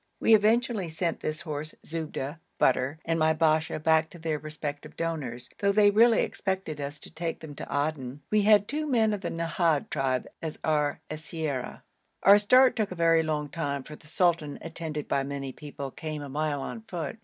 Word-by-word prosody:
We 225 - +5
eventually 220 -2 +3
sent 165 +1 -2
this 155 0 -3
horse, 155 0 -5
Zubda 155 -2 -4 0.2
(butter), 130 +3 +2
and 165 0 0
my 155 0 +4
Basha 160 0 +2
back 160 +1 +3
to 175 - -11
their 160 -2 -2
respective 150 -1 -6
donors, 135 -8 -3
though 200 0 +3
they 205 0 +5
really 230 +2 +5
expected 190 -7 -3
us 140 +1 -4
to - - -12
take 165 0 -4
them 155 -2 -9
to - - -7
Aden. 145 -2 -2
We 215 0 +4
had 205 0 +5
two 305 +2 -2
men 225 -6 +3
of 205 - -3
the - - -3
Nahad 165 -2 0
tribe 135 -3 0
as 160 -2 -4
our 150 -2 +1
siyara. 155 -4 -4 0.4
Our 200 +1 +8
start 250 +5 +6
took 215 -3 0
a 185 - -6
very 165 -1 +4
long 150 -2 -2
time, 140 -4 -3
for 150 - -10
the 150 - -17
sultan, 160 -3 +1
attended 160 -2 -5
by 140 - +1
many 135 -1 -4
people, 140 0 -7
came 155 0 -5
a 140 - -7
mile 145 0 -1
on 225 - -6
foot. 170 +4 -5
160 Hz, 190 wpm, -28 LUFS, 145-180 Hz, 0.4 s, Our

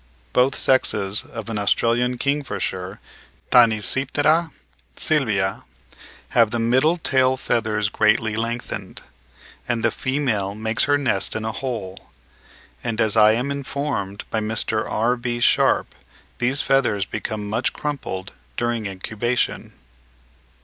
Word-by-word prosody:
Both 130 +2 +3
sexes 105 -5 +1
of 110 -2 -8
an 105 - -2
Australian 120 +5 +1
kingfisher 120 -9 -2 0.5
(Tanysiptera 135 - +3 0.5
sylvia) 105 - 0 0.6
have 115 -3 +4
the 120 - -2
middle 130 +9 +3
tail 130 -5 +2
feathers 110 -4 0
greatly 110 +1 +2
lengthened, 115 +2 -4 0.6
and 120 -2 -1
the - - +3
female 125 -8 -1
makes 110 +1 0
her 145 0 +3
nest 125 -9 0
in 110 0 -3
a 110 - -1
hole; 110 -7 -5 0.7
and 115 -2 -3
as 110 0 +2
I 110 -1 +6
am 125 +5 -1
informed 140 -8 -3
by 110 - +1
Mr. 110 0 -1
R.B. 120 +1 0
Sharpe - - +3 0.5
these 125 +3 +1
feathers 120 -8 +2
become 105 +1 -4
much 110 +4 0
crumpled 125 -10 -4 0.3
during 120 -3 -1
incubation. 110 +5 -2
115 Hz, 115 wpm, -22 LUFS, 105-130 Hz, 0.7 s, I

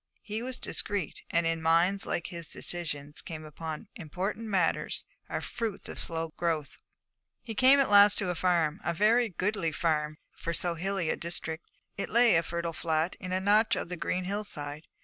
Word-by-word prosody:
He 215 +1 -3
was 255 +1 -3
discreet, 200 -7 -3
and 170 0 +2
in 165 0 0
minds 170 +5 +3
like 170 - -1
his 170 -3 -5
decisions 145 -4 -4
upon 155 0 -6
important 190 +7 -4
matters 185 -6 0 0.2
are - - -2
fruits 230 -4 -4
of - - -5
slow 165 -1 0
growth. 160 -4 -1 0.6
He 225 - -5
came 260 +5 +6
at 275 - +4
last 205 0 +8
to 185 -3 +1
a - - -1
farm, 170 -3 +1
a 170 +1 -1
very 225 +5 +4
goodly 185 -2 -1
farm 155 -1 0 0.2
for 170 - -3
so 175 +1 0
hilly 185 0 -1
a - - 0
district. 165 -1 -4 0.3
It 200 - -2
lay, 235 -3 +5
a 165 - +5
fertile 170 0 -3
flat, 160 +1 0
in 185 - -5
a 185 - +1
notch 210 +3 +4
of - - -4
the 180 - -3
green 180 +2 -1
hillside. 160 -7 -4
175 Hz, 180 wpm, -30 LUFS, 160-205 Hz, 0.6 s, last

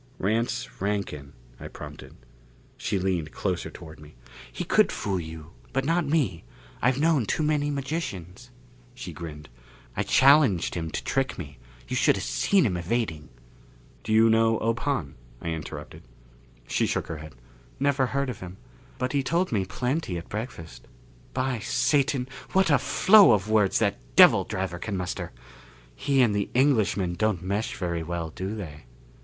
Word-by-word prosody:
"Rance 115 +4 -2
Rankin 100 -9 -3
" - - -25
I - - -7
prompted. - - -10 0.6
She - - -2
leaned 90 -5 -1
closer 90 -3 -2
toward 80 -3 -12
me. 75 -2 -14 0.4
"He - - -4
could - - +3
fool 95 -2 -2
you. 80 -1 -8 0.2
But 135 0 0
not 165 0 +1
me 140 - 0 0.4
I've 125 +3 +2
known 150 -7 +2
too 155 - 0
many 150 -1 +1
magicians." 130 - -4 0.5
She 90 -8 -7
grinned. 75 -2 -8 0.5
"I - - 0
challenged 135 - +4
him 80 -2 -3
to - - -4
trick 135 -1 -1
me. 70 -3 -8 0.3
You - - -3
should - - +4
have - - -4
seen 195 -7 +2
him 90 -6 0
evading!" 85 -5 -2 0.7
"Do 110 - -4
you 110 +1 +6
know 115 0 +3
Ob 115 +1 0
Hahn?" 100 - -2 0.3
I 85 - -4
interrupted. 80 -2 -6 0.7
She - - +1
shook - - -1
her 80 - -6
head. 75 -1 -11 0.4
"Never 140 -1 +2
heard 140 0 -1
of 115 - -9
him. 90 0 -9 0.4
But 125 +1 -2
he 140 - +2
told 170 +7 0
me 100 -5 +1
plenty 125 - -2
at 85 - -8
breakfast. 105 -7 -7 0.5
By 130 -2 0
Satan, 140 +2 +1 0.3
what 190 -3 +4
a 140 - +5
flow 190 +9 +6
of 105 +1 0
words 105 -3 +3
that - - +1 0.2
devil - - +7
driver 95 -2 -3
can 100 0 -3
muster! 90 -1 -4 0.6
He 135 - +2
and 105 -4 +2
the 100 -1 -1
Englishman 110 -9 +2
don't 105 -2 0
mesh 100 +4 -2
very 85 -2 -2
well, 85 0 -4
do 95 +5 -4
they?" 75 - -8
105 Hz, 165 wpm, -26 LUFS, 85-135 Hz, 0.7 s, devil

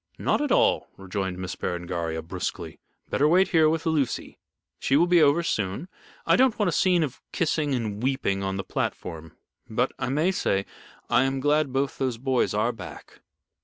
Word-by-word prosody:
"Not - - +1
at 295 -3 -1
all," - - +3
rejoined 95 -1 -4
Miss 95 -1 -5
Berengaria, 85 -2 -3
brusquely, 85 -1 -5 0.3
"better 145 - +3
wait 185 +4 +4
here 160 -3 +4
with 160 0 -1
Lucy. 150 -6 -1 0.4
She 135 - +2
will 170 - +5
be 175 -1 +4
over 150 +3 +4
soon. 105 - -2 0.4
I - - +4
don't 260 -3 +3
want 210 -4 +2
a - - 0
scene 175 +1 +3
of 140 -5 -5
kissing 150 -4 0
and 110 -4 -3
weeping 125 -7 0
on 95 0 -2
the 95 - -3
platform. 80 -3 -4 0.3
But, 125 +4 0
I 130 -2 -2
must 160 +8 +1
say, 100 0 0 0.4
I 120 - +4
am 135 0 -1
glad 145 0 +2
both 135 +1 -1
those 130 -3 -1
boys 130 -3 0
are 110 +3 +2
back." 115 - -11
130 Hz, 180 wpm, -26 LUFS, 95-155 Hz, 0.4 s, will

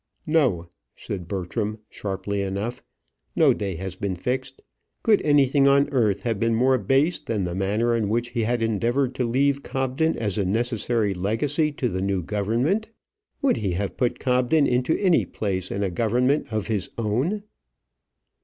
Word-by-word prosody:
"No," 135 - +2 0.3
said 90 -4 -6
Bertram, 100 +3 -3
sharply 100 0 -4
enough. 100 +5 -3 0.5
"No - - +5
day 100 -3 -3
has 95 +2 -5
been 95 0 -3
fixed. 130 +7 -4 0.4
Could 215 -3 +4
anything 140 -1 +4
on 140 +1 +4
earth 110 -7 +1
have 115 -4 -1
been 115 +1 +2
more 130 +2 +3
base 135 - +2
than 105 -4 -2
the 90 -1 -3
manner 105 +5 +1
in 110 -3 0
which 120 +2 0
he 120 -1 -2
has 120 +2 0
endeavoured 120 +4 +1
to 125 -1 -1
leave 140 +3 +2
Cobden 135 +5 -1
as 105 -2 -1
a - - +2
necessary 115 +1 0
legacy 130 - 0
to 135 -3 -1
the 95 -5 -2
new 95 -2 -1
government? 120 - 0 0.5
Would 275 - +3
he 100 -5 -1
have 100 +2 -3
put 125 -2 0
Cobden 125 +4 +2
into 125 +4 +1
any 185 -5 +3
place 95 -3 -3
in 100 - -2
a 95 - -1
government 125 - +1
of 110 -2 -1
his 105 -5 -2
own?" 130 - -1
115 Hz, 165 wpm, -24 LUFS, 100-135 Hz, 0.5 s, No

